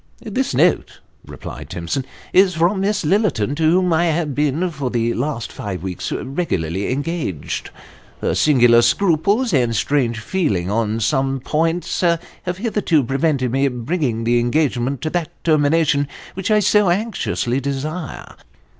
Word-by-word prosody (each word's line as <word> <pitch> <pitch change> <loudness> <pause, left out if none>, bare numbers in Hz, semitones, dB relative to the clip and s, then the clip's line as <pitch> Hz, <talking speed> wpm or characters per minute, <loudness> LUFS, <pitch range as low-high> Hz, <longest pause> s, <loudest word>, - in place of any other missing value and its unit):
" - - -31
This - - -2
note," - - +2 0.2
replied - - -9
Timson, 85 +10 -3 0.2
" - - -24
is 185 -1 +5
from 175 +4 +2
Miss 205 +1 0
Lillerton, 155 - +1
to 160 -1 +3
whom 180 0 +3
I 165 +2 +3
have 160 -3 0
been 150 +5 0
for 140 -5 -3
the 115 -1 0
last 125 -2 -3
five 95 -3 -6
weeks 95 -2 -4
regularly 100 - -2
engaged. 140 - -3 0.5
Her - - 0
singular 120 -5 +5
scruples 200 - +2
and 120 -5 +2
strange 120 -1 0
feeling 110 - -1
on 110 0 0
some 135 +3 +1
points 165 +6 -1
have 170 -2 +3 0.4
hitherto 200 - +1
prevented 135 0 0
my 135 +1 +2
bringing 125 -1 -2
the 120 +1 +2
engagement 130 0 0
to 155 - -2
that 175 -4 -1
termination 150 -2 +2 0.3
which 190 +2 -4
I 215 -1 +4
so 210 -1 +3
anxiously 175 - -1
desire. 140 +3 -5
145 Hz, 145 wpm, -20 LUFS, 120-175 Hz, 0.5 s, is